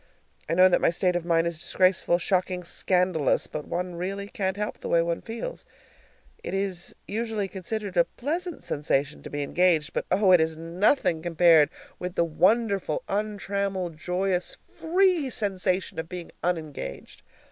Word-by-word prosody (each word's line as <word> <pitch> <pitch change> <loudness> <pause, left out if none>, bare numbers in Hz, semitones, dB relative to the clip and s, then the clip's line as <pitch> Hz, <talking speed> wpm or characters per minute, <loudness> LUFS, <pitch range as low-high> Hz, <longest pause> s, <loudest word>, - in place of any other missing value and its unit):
I 165 - +1
know 185 +1 +7
that 185 - +2
my - - +4
state 180 +1 +1
of 175 -1 -1
mind 165 -1 +2
is 170 -2 -2
disgraceful, 185 0 +2
shocking, 180 0 0
scandalous, 180 -3 +1
but 150 -1 -6
one 180 +1 -3
really 195 +3 -4
can't 190 -1 -2
help 210 0 -3
the - - -6
way 170 - +4
one 170 0 -2
feels. 235 - -6 0.8
It - - -3
is 195 -3 -2
usually 220 -1 -2
considered 195 +1 -5
a 170 -1 +5
pleasant 335 +6 -4
sensation 140 - -1
to - - -9
be 145 0 -3
engaged, 170 0 +2
but, - - -2
oh, 190 +1 +4
it 180 -3 +7
is 160 0 0
nothing 170 - +1
compared 165 -2 +5 0.3
with 180 0 -5
the 170 - +3
wonderful 195 0 +1
untrammeled, 200 -3 -2
joyous, 180 +1 0
free 350 -3 +1
sensation 190 -6 -1
of 160 0 -5
being 180 -2 -7
unengaged! 155 - -4
180 Hz, 160 wpm, -26 LUFS, 170-200 Hz, 0.8 s, know